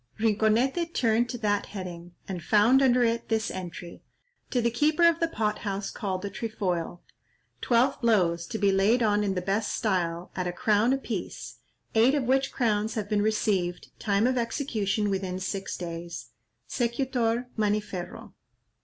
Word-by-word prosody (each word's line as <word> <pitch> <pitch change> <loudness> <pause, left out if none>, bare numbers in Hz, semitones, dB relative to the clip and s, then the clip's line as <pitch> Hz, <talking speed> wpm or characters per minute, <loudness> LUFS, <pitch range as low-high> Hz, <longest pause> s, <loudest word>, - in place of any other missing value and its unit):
'" - - -30
Rinconete 230 - +1
turned 235 0 +2
to 245 - -4
that 205 -3 0
heading, 175 -3 -8
and 185 -3 -4
found 220 +8 +5
under 250 -2 +4
it 230 0 0
this 220 -1 0
entry:—"To 185 - -7
the 235 0 +1
keeper 305 +7 +3
of 335 -1 +3
the 330 - +2
pot 215 -9 -1
house 200 -1 -3
called 190 -3 -3
the 200 - -4
Trefoil, 185 -6 -3 0.6
twelve 250 +3 +2
blows, 175 -8 +2
to 225 - -4
be 200 -2 +3
laid 205 +6 +3
on 210 -1 +2
in 195 -2 -1
the 180 - -2
best 205 +3 -1
style, 175 -5 -1
at 180 -1 -2
a - - -1
crown 220 +2 +2
a 270 - +2
piece, 225 -9 -6 0.4
eight 240 +5 +4
of 285 - +1
which 270 +2 +1
crowns 220 -3 0
have 210 -2 -3
been 210 -1 +2
received; 200 -4 0
time 205 0 +1
of 255 0 +2
execution, 220 -5 -1
within 190 -1 -2
six 190 +1 -4
days. 170 -1 -7 0.3
Secutor, 240 -1 -1
Maniferro." 210 -1 -3
215 Hz, 160 wpm, -27 LUFS, 190-240 Hz, 0.6 s, found